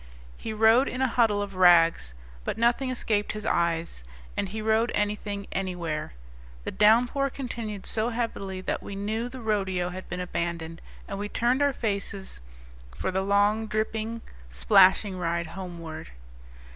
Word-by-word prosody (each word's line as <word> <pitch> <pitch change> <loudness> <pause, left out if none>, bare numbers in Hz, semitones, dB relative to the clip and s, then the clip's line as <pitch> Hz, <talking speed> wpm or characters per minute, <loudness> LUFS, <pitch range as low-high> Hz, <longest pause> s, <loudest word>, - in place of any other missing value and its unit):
He 225 - -6
rode 225 +4 +5
in 255 - -4
a 265 - +3
huddle 225 -4 +2
of 200 -1 -7
rags; 170 - +5 0.3
but - - -3
nothing 240 +3 +2
escaped 215 -4 0
his 215 0 -6
eyes, 170 - 0 0.3
and 195 - -1
he 215 +3 -5
rode 220 +2 +2
anything 205 -1 -2
anywhere. 175 - -3 0.5
The - - -4
downpour 240 +6 +4
continued 230 -7 -5
so 220 +1 0
heavily 200 -5 -3
that - - -2
we 200 - -7
knew 220 +4 -2
the 255 0 -9
rodeo 190 -5 0
had 185 +1 -8
been 180 - -4
abandoned, 170 -2 -3 0.3
and 195 - -5
we 205 0 -3
turned 245 +6 +1
our 285 0 +4
faces 200 - -3 0.6
for 75 - -2
the 190 +1 0
long, 205 +3 +2
dripping, 220 +1 -2 0.3
splashing 185 - +4
ride 170 0 -1
homeward. 170 - -7
205 Hz, 150 wpm, -27 LUFS, 180-225 Hz, 0.6 s, rode